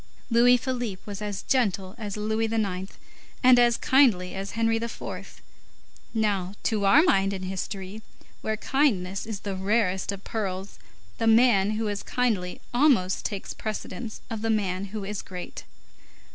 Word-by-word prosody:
Louis 245 +2 +6
Philippe 245 -6 -3
was 205 -1 -6
as 205 -2 -4
gentle 195 -7 0
as 210 -2 -5
Louis 220 +1 0
IX. 195 -4 -1 0.5
and 250 -1 +7
as 240 -1 +4
kindly 220 -10 +3
as 195 +1 -5
Henri 225 0 +2
IV. 230 0 -7 0.7
Now, 200 -3 0
to 210 -3 0
our 275 +11 +7
mind, 195 - +3
in 190 -1 -5
history, 190 +2 -5 0.4
where 220 0 -2
kindness 210 -8 0
is 210 -4 -5
the 200 -2 -4
rarest 190 -1 +1
of 200 0 -7
pearls, 195 -3 -4 0.4
the 225 - +1
man 220 -3 +4
who 220 0 -1
is 205 -1 -2
kindly 215 -8 -1
almost 240 -9 +3
takes 200 -3 -4
precedence 215 +1 -5
of 225 -2 -5
the 225 - -1
man 200 -3 0
who 205 +1 -6
is 205 0 -4
great. 180 -1 -8
210 Hz, 150 wpm, -26 LUFS, 190-230 Hz, 0.7 s, and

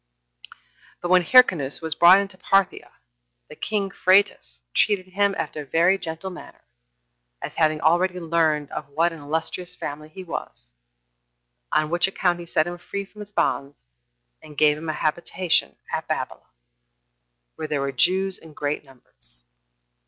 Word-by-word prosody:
2. - - -15 0.5
But 175 - -2
when 185 0 +6
Hyrcanus 175 - +5
was 160 -1 -1
brought 170 +3 +7
into 200 -1 -4
Parthia 195 0 +1 0.6
the - - -11
king 200 -2 -2
Phraates 185 - +2
treated 200 -3 +2
him 200 +1 +1
after 155 -1 -4
a - - -9
very 175 +7 +3
gentle 165 +2 -6
manner, 180 - -12 0.8
as - - -6
having 155 -1 +2
already 180 +4 +2
learned 160 -3 0
of 140 - -6
what 165 +4 +1
an 165 - -10
illustrious 160 +4 -3
family 150 0 -7
he 185 +4 -9
was; - - -7 1.0
on 155 0 +1
which 175 +2 +3
account 180 -2 0
he 170 - -9
set 155 -1 +2
him 175 0 -6
free 200 +3 -5
from 210 +2 -18
his 205 0 -10
bonds, 140 - -1 0.6
and 150 -2 -14
gave 150 -1 +5
him 155 +1 -6
a - - 0
habitation 170 +3 0 0.2
at - - -2
Babylon, - - -3
1 - - -39 1.1
where 155 - -4
there 150 -2 -1
were 140 0 -1
Jews 185 +9 +1
in 160 -1 -15
great 145 0 -3
numbers. - - -9
165 Hz, 160 wpm, -24 LUFS, 150-185 Hz, 1.1 s, brought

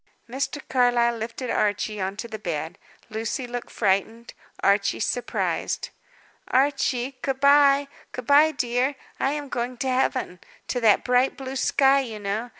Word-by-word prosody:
Mr. 270 +4 -3
Carlyle 245 -2 +3
lifted 230 +3 -5
Archie 205 0 0
on 190 +1 -3
to 235 - -5
the 220 -1 -7
bed. 170 -2 -4 0.3
Lucy 225 +4 -3
looked 245 0 -6
frightened, 220 +3 -1 0.3
Archie 200 0 +2
surprised. 245 +2 -2 0.6
"Archie, 265 -1 0
good 270 -1 -2
bye; 280 0 +5 0.2
good 250 - -7
bye, 290 +4 +6
dear, 255 0 0 0.2
I 270 - +1
am 295 -1 -4
going 245 -1 -3
to 265 - -2
Heaven; 255 -7 0 0.3
to 250 - 0
that 220 -3 +4
bright, 250 +1 +2
blue 270 0 -6
sky, 270 +1 +3
you 235 -5 -4
know. 210 +4 -3
245 Hz, 150 wpm, -24 LUFS, 220-270 Hz, 0.6 s, bye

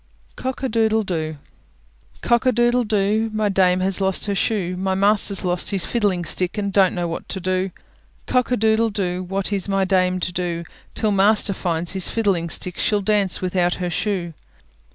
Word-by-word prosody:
COCK 260 +1 -5
A - - +1
DOODLE 220 -1 +2
DOO 160 -5 -3 0.8
Cock 240 +1 +2
a - - +5
doodle 240 +1 +2
doo! 215 +1 0
My 215 -1 0
dame 185 -2 +2
has 190 +1 +1
lost 190 -1 +1
her 205 - -1
shoe; 195 -3 -1
My 190 +1 -1
master's 200 0 +2
lost 180 0 +1
his 195 -4 0
fiddling 200 -7 0
stick, 180 +4 0
And 200 -1 -2
don't 190 -2 +4
know 175 -1 -2
what 165 - -6
to 190 - -3
do. 185 +1 -1 0.6
Cock 250 -1 +1
a 250 - +1
doodle 220 +1 +2
doo! 185 -3 -2
What 195 +2 -3
is 200 0 -2
my 195 -1 +1
dame 185 -1 +1
to 175 - -1
do? 170 -1 -3 0.3
Till 215 - 0
master 205 +1 +3
finds 170 -2 -2
his 190 -2 -1
fiddling 195 -7 0
stick, 180 +2 -2
She'll 210 -1 +1
dance 200 -2 +1
without 180 -1 +1
her 180 -1 -3
shoe. 180 -3 -2
195 Hz, 190 wpm, -21 LUFS, 180-215 Hz, 0.8 s, a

